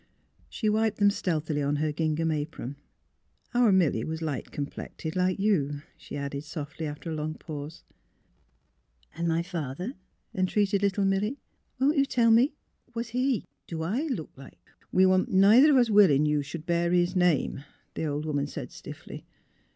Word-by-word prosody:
She 220 - -3
wiped 215 0 +1
them 205 -1 +4
stealthily 155 -6 -1
on 145 +1 0
her 150 +1 0
gingham 160 +1 0
apron. 145 -3 -4 0.4
*' - - -42
Our 240 -3 +4
Milly 165 -12 +3
was 160 0 -4
light 150 -5 -3
complected, 155 +3 -6
like 185 0 +1
you," 150 -9 0
she - - -8
added, 140 0 -4
softly, 155 0 -6
after 150 +3 -6
a - - -2
long 155 0 -3
pause. 150 0 -8 0.7
" 60 - -37
And 170 +1 -2
my 165 0 +1
father," 170 - -4 0.4
entreated 200 0 +1
little 200 0 +1
Milly. 200 +7 0 0.2
*' - - -45
Won't 285 +4 +3
you 275 - +4
tell 230 -3 +3
me? 240 +7 +4 0.2
— 245 - -36
Was 230 0 -3
he 250 0 0
— - - -51
do 160 -1 -4
I 235 - -1
look 235 - -4
like 130 -9 -13 0.2
" - - -33
We 185 +1 +5
wa'n't 185 0 +3
neither 210 +10 +6
of 285 - +5
us 240 -3 +3
willin' 180 -9 +6
you 150 -1 +2
should 150 +3 -7
bear 170 0 +1
his 180 +1 +2
name," 175 -6 +1 0.3
the - - -3
old 150 0 -2
woman 145 -2 -1
said, - - -7
stiffly. - - -10
170 Hz, 180 wpm, -28 LUFS, 150-205 Hz, 0.7 s, neither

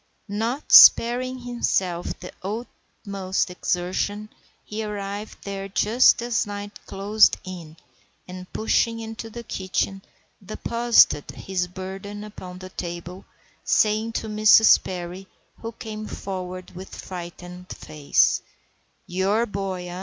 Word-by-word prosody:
Not 225 +7 -3
sparing 255 +2 +8
himself 195 -8 -2
the 180 - -9
utmost 195 -3 -4
exertion, 185 +4 -2 0.4
he 215 +1 -4
arrived 205 0 -5
there 195 -1 -5
just 230 +5 +4
as 230 -3 0
night 205 0 -7
closed 205 +2 +3
in, 170 -4 -9 0.5
and, 185 0 -9
pushing 230 +1 +1
into 225 0 -7
the 235 +2 -8
kitchen, 195 -1 -2 0.4
deposited 230 -5 +3
his 185 -2 -3
burden 195 +3 -7
upon 185 -4 -9
the 185 0 -9
table, 175 +1 -7 0.4
saying 215 +1 +2
to 225 - -3
Mrs. 215 +1 +6
Perry, 180 +1 -6 0.3
who 230 - -6
came 215 -1 -7
forward 185 -1 -6
with 185 +2 -10
frightened 180 0 -9
face,— 150 -2 +1 0.6
"Your 195 +6 +1
boy, 195 -4 -4
eh? 175 +1 -6
195 Hz, 115 wpm, -24 LUFS, 185-220 Hz, 0.6 s, sparing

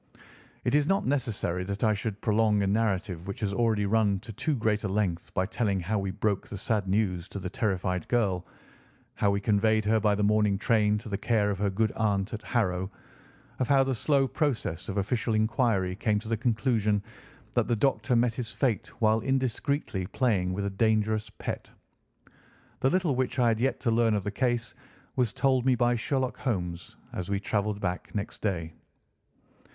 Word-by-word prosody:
It 120 - 0
is 145 0 +3
not 195 +2 +2
necessary 115 -10 -1
that 100 +2 -4
I 110 -1 +4
should 105 0 -4
prolong 105 -2 +2
a - - +1
narrative 95 -4 0
which 100 - -5
has 100 -2 -1
already 110 -2 +1
run 105 -1 +2
to 115 - -9
too 150 +8 -1
great 110 -3 0
a - - 0
length 95 -4 -1
by 95 - +2
telling 105 -2 0
how 105 +5 -1
we 95 -1 -2
broke 100 +1 -1
the 105 - -6
sad 105 -1 -1
news 95 -3 0
to - - -7
the 90 -1 -5
terrified 90 -4 -1
girl, 100 -7 +1 0.7
how 100 - +1
we 100 0 +1
conveyed 110 +1 +2
her 110 +1 +3
by 105 -1 +2
the 105 - 0
morning 105 -1 +3
train 105 -1 +2
to 110 - -8
the 100 -2 -3
care 105 -4 +2
of 95 - -4
her 100 0 +1
good 110 +3 +1
aunt 105 -2 0
at 110 - -4
Harrow, 95 -5 0 0.7
of 130 - +1
how 140 -1 +5
the 135 0 0
slow 135 +3 +2
process 120 - -2
of 100 - -3
official 110 +3 0
inquiry 110 -4 +1
came 105 0 +1
to 110 +2 -5
the 115 - +1
conclusion 110 -2 +1 0.5
that - - +1
the 120 - +2
doctor 115 0 +1
met 120 0 +3
his 120 -1 -4
fate 120 -8 0
while 110 0 +4
indiscreetly 130 -5 -1
playing 100 -5 +1
with 100 +2 -2
a 100 - -2
dangerous 110 -1 +2
pet. - - -5 1.1
The 130 - +3
little 180 -2 +1
which 130 0 -1
I 120 -2 +4
had 110 -1 +1
yet 135 +3 0
to 120 - +1
learn 115 -1 +3
of 100 - -1
the 105 - -2
case 120 +1 -1 0.4
was 125 -5 +1
told 130 +1 +2
me 130 0 +3
by 120 0 +2
Sherlock 130 +2 -1
Holmes 90 - -3 0.2
as 90 +1 -4
we 100 -1 0
travelled 105 0 -1
back 90 0 -4
next 100 0 -4
day. 85 -6 -2
110 Hz, 195 wpm, -28 LUFS, 100-120 Hz, 1.1 s, how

